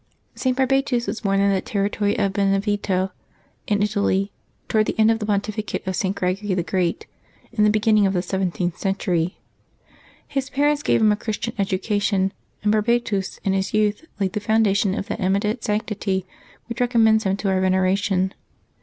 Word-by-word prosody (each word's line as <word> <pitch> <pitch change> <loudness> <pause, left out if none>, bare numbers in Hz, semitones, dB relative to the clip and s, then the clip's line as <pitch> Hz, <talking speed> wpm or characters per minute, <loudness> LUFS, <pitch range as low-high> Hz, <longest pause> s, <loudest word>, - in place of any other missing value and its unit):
[t. 260 - 0
Barbatus 265 -1 +1
was 205 +3 -4
born 195 -3 +1
in 200 0 +3
the 190 - +1
territory 205 0 -1
of 195 -2 +1
Benevento 195 -1 0 0.6
in 205 -1 +2
Italy, 205 -1 0 0.4
toward 215 -1 +2
the - - -2
end 220 0 +5
of 225 - 0
the 210 - -4
pontificate 210 +1 -2
of 190 0 -2
St. 195 0 -1
Greg 185 0 -1
ory 200 -3 0
the 175 - 0
Great, 180 -1 -1 0.5
in 215 -3 +1
the 210 - +5
beginning 215 -1 +3
of 190 - 0
the 180 -2 0
seventh 180 -2 -2
century. 180 -3 -1 0.9
His 275 -2 -3
parents 290 +2 +1
gave - - +2
him 215 -1 +5
a - - +3
Christian 215 0 -4
education, 195 0 0 0.3
and 210 - +3
Barbatus 215 -3 0
in 195 - +1
his 195 +2 -1
youth 215 +7 +1
laid 190 -2 0
the - - -1
foundation 205 -2 +2
of - - -3
that 215 0 -4
eminent 205 +4 0
sanctity 210 -3 -1 0.4
which 235 +1 -5
recommends 225 -3 +3
him 190 0 +1
to 200 -1 -1
our 190 -1 +1
veneration. 190 0 +1
205 Hz, 175 wpm, -22 LUFS, 190-220 Hz, 0.9 s, end